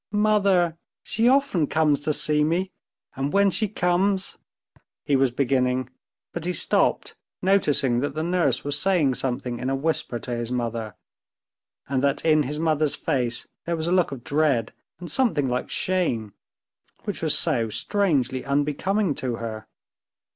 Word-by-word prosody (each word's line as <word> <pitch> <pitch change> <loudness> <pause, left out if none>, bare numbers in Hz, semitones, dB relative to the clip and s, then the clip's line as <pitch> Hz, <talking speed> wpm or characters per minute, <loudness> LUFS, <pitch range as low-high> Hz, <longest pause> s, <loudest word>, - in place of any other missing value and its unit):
"Mother! 200 -5 +2 0.2
She 225 +2 +1
often 255 - +3
comes 155 -2 +2
to 150 +1 -1
see 150 0 +2
me, 175 +5 0 0.4
and 135 +1 -2
when 200 0 +3
she 215 +5 0
comes...." 190 0 0 0.6
he 145 - +1
was 135 -1 +3
beginning, 125 0 0 0.4
but 170 - -5
he 180 +1 -1
stopped, - - +1 0.3
noticing 145 -10 +3
that 140 +2 -3
the 155 - -2
nurse 175 0 +1
was 145 0 -1
saying 170 -7 +2
something 125 -1 -3
in 130 - -2
a 135 - 0
whisper 140 -3 -1
to 125 - -7
his 120 0 -3
mother, 115 -4 -3 0.9
and 130 -1 0
that 140 0 0
in 155 -1 +4
his 145 +1 -3
mother's 155 -2 +1
face 125 -6 -1 0.2
there 170 - -1
was 160 -1 -3
a 170 - -1
look 180 -4 +2
of 130 -4 -7
dread 140 -6 +1 0.3
and 175 -3 -7
something 160 - +2
like 125 0 -2
shame, 125 - -1 0.7
which - - -4
was - - +2
so 115 -1 +1
strangely 135 - 0
unbecoming 150 +7 0
to 125 -3 -3
her. 110 -2 -6
150 Hz, 155 wpm, -24 LUFS, 130-180 Hz, 0.9 s, in